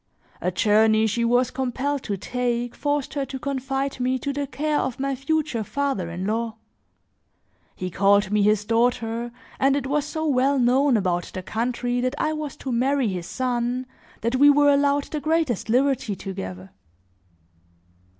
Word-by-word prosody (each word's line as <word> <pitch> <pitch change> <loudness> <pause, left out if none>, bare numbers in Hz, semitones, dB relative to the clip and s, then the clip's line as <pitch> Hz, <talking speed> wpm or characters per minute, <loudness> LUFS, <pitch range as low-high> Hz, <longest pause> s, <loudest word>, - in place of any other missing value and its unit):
A 180 - +1
journey 220 +3 +3
she 220 +2 0
was 245 +2 +2
compelled 265 +2 -2
to 200 -2 -2
take, 245 +2 -2
forced 290 -2 -2
her 280 -1 -1
to 270 - -5
confide 270 0 -3
me 255 +1 +1
to 280 +2 -3
the 285 0 -2
care 300 +2 -1
of 260 - -3
my 275 0 -1
future 275 -3 -1
father 270 -8 -2
in 175 +2 -4
law. 225 +1 -1 1.2
He 185 0 -5
called 200 +2 +3
me 210 0 +3
his 210 0 +3
daughter 230 0 0 0.3
and 270 +1 +3
it 280 -2 -1
was 290 +2 0
so 315 +1 -3
well 275 -1 +2
known 255 +1 +3
about 175 -3 -1
the 185 - -4
country 245 +3 -1
that 255 +2 -1
I 310 +1 0
was 305 -2 -5
to 265 - -5
marry 260 0 +1
his 180 -2 -4
son 250 0 -1 0.4
that 235 +3 0
we 290 +2 +7
were 290 0 +5
allowed 285 0 +2
the 305 - -5
greatest 310 - 0
liberty 250 -3 +1
together. 95 - -7
250 Hz, 165 wpm, -24 LUFS, 220-280 Hz, 1.2 s, we